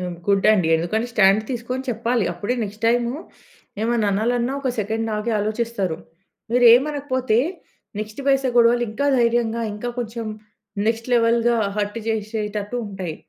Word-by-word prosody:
హ్మ్. 180 -1 -4
గుడ్ 200 -1 +3
అండి. 185 -6 +2
ఎందుకంటే 215 +8 -1
స్టాండ్ 205 -1 +4
తీసుకొని 250 +1 -3
చెప్పాలి. 230 -1 0
అప్పుడే 205 +7 -2
నెక్స్ట్ 210 +2 -7
టైము 240 +1 +1 0.7
ఏమన్నా 225 -2 +1
అనాలి 220 +5 +1
అన్నా 240 +2 -1
ఒక 270 - -2
సెకండ్ 220 +2 -2
ఆగి 210 +2 -2
ఆలోచిస్తారు. 210 -4 -2 0.6
మీరు 245 0 +4
ఏమనకపోతే 260 -4 0 0.6
నెక్స్ట్ 215 +4 -6
పైసా 270 -1 +3
గొడవలు 240 0 +5
ఇంకా 280 +6 -1
ధైర్యంగా 235 -1 +1
ఇంకా 225 +4 -5
కొంచెం 230 -1 -4 0.6
నెక్స్ట్ 225 +1 -1
లెవెల్‌గా 235 0 +3 0.2
హర్ట్ 205 +1 -2
చేసేటట్టు 215 0 -3
ఉంటాయి. 190 -5 -5
230 Hz, 140 wpm, -22 LUFS, 210-240 Hz, 0.7 s, గొడవలు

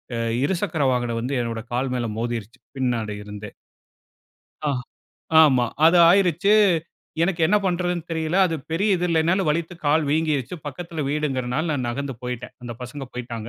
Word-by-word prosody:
அ - - -2 0.3
இருசக்கர 170 -2 -1
வாகனம் 120 -2 -1
வந்து 125 +4 -3
என்னோட 115 -1 -3
கால் 125 +2 0
மேல 120 -1 -1
மோதிருச்சு, 115 0 -4 0.2
பின்னாடி 120 -5 -1
இருந்தே. 105 0 -8 1.2
ஆ, - - +2 0.7
ஆமா. 130 -5 +4 0.2
அது 170 +2 +5
ஆயிருச்சு. 190 +1 +3 0.7
எனக்கு 175 0 0
என்ன 205 +6 +3
பண்ணுறதுன்னு 175 -2 -1
தெரியல. 160 +1 -1
அது 165 - -2 0.2
பெரிய 195 +6 +1
இது 175 - -2
இல்லன்னாலும் 170 +2 +2
வலித்து 165 +3 -1
கால் 155 +2 +3
வீங்கிருச்சு. 155 -2 0
பக்கத்தில 165 +2 -5
வீடுங்கிறனால 140 -1 -1
நான் 130 -4 -2
நகர்ந்து 135 +2 -3
போயிட்டேன். 125 -1 -5
அந்த 120 -1 -6
பசங்க 135 +3 -6
போய்ட்டாங்க. 115 -2 -6
145 Hz, 145 wpm, -23 LUFS, 120-170 Hz, 1.2 s, அது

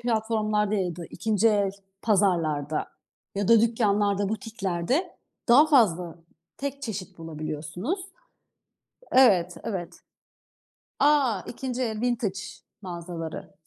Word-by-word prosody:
platformlarda 215 -2 0
ya 180 -4 -1
da, 170 - -7
2. 220 0 +1
el 205 -2 +2 0.3
pazarlarda 165 -8 +1 0.5
ya 200 -1 -1
da 230 -2 +7
dükkanlarda, 205 -3 +2
butiklerde 220 - -2 0.3
daha 270 +6 +7
fazla 180 - +3 0.4
tek 280 0 -5
çeşit 205 -9 -6
bulabiliyorsunuz. 160 - -4 1.1
Evet, 185 -9 +5
evet. 190 -6 -5 1.0
A, 275 -9 +3
2. 255 0 -4
el, 220 -3 -2
vintage 235 -6 0 0.4
mağazaları. 170 -3 -6
210 Hz, 95 wpm, -26 LUFS, 175-235 Hz, 1.1 s, da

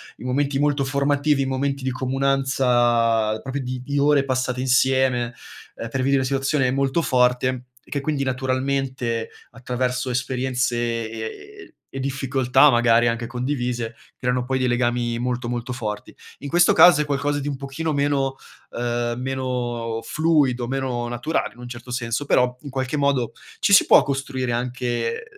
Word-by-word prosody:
i - - -13
momenti 140 +2 0
molto 145 -1 +1
formativi, 140 +1 +1
i - - 0
momenti 135 +1 -2
di 130 - -1
comunanza 125 -4 +1
proprio 135 +1 -4
di 125 0 -5
di 145 +2 -3
ore 145 0 +4
passate 130 -1 -1
insieme, 130 -1 +2 0.4
ehm, 115 - -6
per 135 - -3
vivere 135 +1 +2
una 135 - +2
situazione 135 0 +1
molto 135 +4 +1
forte, 125 -2 +1 0.2
che 145 - -4
quindi 140 0 -1
naturalmente 130 -2 -1 0.2
attraverso 125 +2 -2
esperienze 125 -1 -1 0.3
e 115 - -7 0.5
ehm, - - -22 0.2
e - - -3
difficoltà 135 0 +3
magari 120 -1 +4
anche 115 0 -1
condivise, 120 -2 -3 0.2
creano 125 0 -1
poi 130 +1 0
dei 130 -1 +1
legami 120 -1 0
molto 125 0 -2
molto 120 +1 -3
forti. 105 -4 -5 0.3
In 140 - -6
questo 175 +6 +4
caso 175 -6 +7
è - - -1
qualcosa 145 0 -1
di 145 - -5
un 145 - -2
pochino 140 +4 -4
meno 140 -1 0 0.4
uhm, 120 0 -2
meno 125 -3 -3
fluido, 145 -6 +1
meno 130 -2 -2
naturale, 120 +2 -2
in 120 - -20
un 120 0 -8
certo 120 +1 -9
senso, 120 +2 -2
però 125 -2 +2
in 145 - -9
qualche 130 +2 -2
modo, 140 -4 +1 0.3
ci 200 - +2
si 195 - +7
può - - +7
costruire 135 -3 -2
anche 120 - -2
130 Hz, 160 wpm, -22 LUFS, 120-140 Hz, 0.5 s, caso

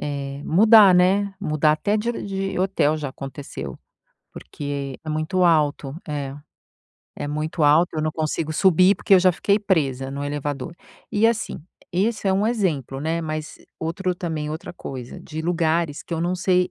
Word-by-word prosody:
eh, 140 -1 -4
mudar, 210 +2 +7
né, 195 +2 +3
mudar 155 -4 +2
até 200 +8 0
de 235 +3 -1
de 195 -1 -3
hotel 185 -5 +1
já 145 -2 -4
aconteceu. 130 - -8 0.5
Porque 140 - -6
é 155 - -7
muito 155 +4 0
alto, 150 -4 +2
é 140 -2 -4 0.8
é - - -4
muito 155 +2 -2
alto, 155 +4 +5
eu 155 - 0
não 155 0 -1
consigo 155 0 -2
subir 185 +3 +5
porque 195 - +3
eu 185 - +6
já 185 0 +4
fiquei 200 +4 +1
presa 140 -10 0
no 140 +1 -4
elevador. 145 +1 -4 0.4
E, 210 +2 +4
assim, 230 -2 -1 0.3
esse 205 +3 0
é - - +3
um 200 +3 +1
exemplo, 160 - -1
né, 160 +3 -1
mas 155 -1 -5 0.2
outro 180 +3 -2
também 160 -4 -4
outra 155 +1 -6
coisa 130 -7 -8
de 160 0 -6
lugares 165 -2 0
que 170 - -5
eu 165 - -2
não 175 +2 0
sei 180 0 +2
160 Hz, 170 wpm, -23 LUFS, 145-185 Hz, 0.8 s, mudar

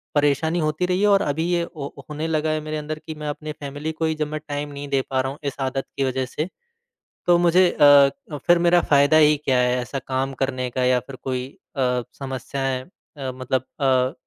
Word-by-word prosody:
परेशानी 145 +3 +2
होती 155 +2 0
रही 180 +1 0
है 210 - +4
और 200 -1 +5
अभी 150 -2 -1
ये 175 -1 +2 0.2
हो 140 -1 -5 0.2
होने 150 +2 -3
लगा 155 -1 0
है 155 0 -1
मेरे 155 0 -4
अंदर 155 +1 -5
कि 160 - -5
मैं 150 0 -6
अपनी 155 +1 -5
फैमिली 145 +1 -5
को 160 +1 -2
ही 160 0 0
जब 155 -1 -2
मैं 155 +1 -4
टाइम 145 0 -3
नहीं 140 0 -6
दे 135 -1 +2
पा 130 -1 +1
रहा 130 0 -2
हूँ 140 - -10
इस 140 -2 -3
आदत 135 0 -1
की 140 - +1
वजह 130 0 -1
से, 150 +5 -3 0.8
तो 175 -1 +6
मुझे 175 +1 +5
अ, 145 -2 +7 0.4
फिर 175 0 +6
मेरा 175 0 +4
फ़ायदा 145 +1 +4
ही 150 -1 +6
क्या 130 -2 +3
है 125 0 +2
ऐसा 135 +3 -4
काम 135 +1 -1
करने 130 -1 -2
का 130 +1 -2
या 125 0 +4
फिर 130 +2 -10
कोई 130 -1 -2 0.3
अ, 125 -2 +1 0.2
समस्याएँ 135 0 -3 0.4
अ, 135 -2 -3
मतलब 130 0 -2 0.2
अ, 130 -1 +3
145 Hz, 225 wpm, -23 LUFS, 130-155 Hz, 0.8 s, अ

